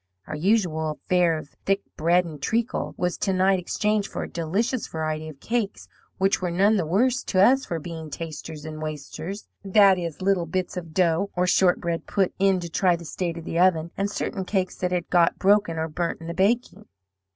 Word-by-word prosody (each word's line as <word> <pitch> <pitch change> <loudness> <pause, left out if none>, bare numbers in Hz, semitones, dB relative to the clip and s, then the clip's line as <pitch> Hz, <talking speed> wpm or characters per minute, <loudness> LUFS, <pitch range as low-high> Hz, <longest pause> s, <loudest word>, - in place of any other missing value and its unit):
Our 155 - -5
usual 160 -4 +1
fare 175 -3 +3
of 155 - -9
thick 195 0 +1
bread 175 +3 +3
and 155 -4 -9
treacle 230 - -1
was 180 0 -1
to 195 - 0
night 190 +1 +3
exchanged 210 +3 0
for - - -3
a - - -5
delicious 200 +10 -1
variety 155 0 -3
of 145 -3 -12
cakes, 225 +3 -2 0.3
which 195 +2 +2
were 180 - -1
none 195 +5 +3
the 170 -5 -1
worse 245 +9 +2
to 185 - 0
us 260 +7 +5
for 170 - -3
being 160 0 -7
'tasters 160 -1 -7
and 155 0 -7
wasters' 155 +6 -6 0.2
that 195 -1 +5
is, 170 -3 -5
little 185 -3 +1
bits 185 +3 -2
of 170 -3 -7
dough, 180 +1 +2
or 180 0 +2
shortbread, 180 -2 +2
put 195 -3 +1
in 195 -1 +3
to 170 - -5
try 175 +2 +2
the 170 0 -9
state 170 +1 -3
of 165 - -8
the 165 - -2
oven, 170 -2 +3
and 200 +1 -1
certain 195 -1 -3
cakes 185 -1 -1
that 180 0 -1
had 175 -1 -1
got 170 -2 +4
broken 200 -4 +3
or 160 0 -1
burnt 170 +2 -3
in 165 - -10
the 170 - -4
baking. 205 +7 0
180 Hz, 205 wpm, -25 LUFS, 165-195 Hz, 0.3 s, us